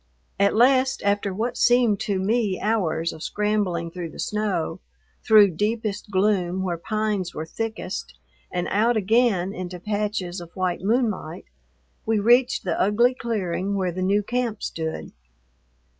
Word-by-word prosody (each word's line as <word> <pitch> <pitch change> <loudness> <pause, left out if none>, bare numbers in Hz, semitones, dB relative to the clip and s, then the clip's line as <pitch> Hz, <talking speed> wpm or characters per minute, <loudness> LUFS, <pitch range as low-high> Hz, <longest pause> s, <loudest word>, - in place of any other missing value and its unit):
At 200 +1 +3
last, 260 +3 +3
after 200 0 +1
what 230 +6 -3
seemed 240 -4 +4
to 200 -2 -1
me 205 0 0
hours 170 -7 0
of 160 - -11
scrambling 200 -5 -1
through 175 -1 -6
the - - -13
snow, 210 -6 -2 0.4
through 210 -3 +6
deepest 210 +3 -2
gloom 190 -2 +1
where 175 -3 -2
pines 210 -2 -2
were 155 - -4
thickest, 225 +6 -5 0.4
and 180 -1 -2
out 225 +4 +2
again 205 -3 +2
into 180 -1 -6
patches 205 -3 -3
of 170 - -10
white 185 -2 -1
moonlight, 210 -6 -1 0.6
we 225 0 +1
reached 240 +4 +3
the 175 -3 -1
ugly 235 +5 +3
clearing 200 -5 -2
where 185 -2 0
the 185 +2 -5
new 200 +3 +2
camp 240 -1 -2
stood. 160 -1 -4
205 Hz, 145 wpm, -24 LUFS, 180-220 Hz, 0.6 s, through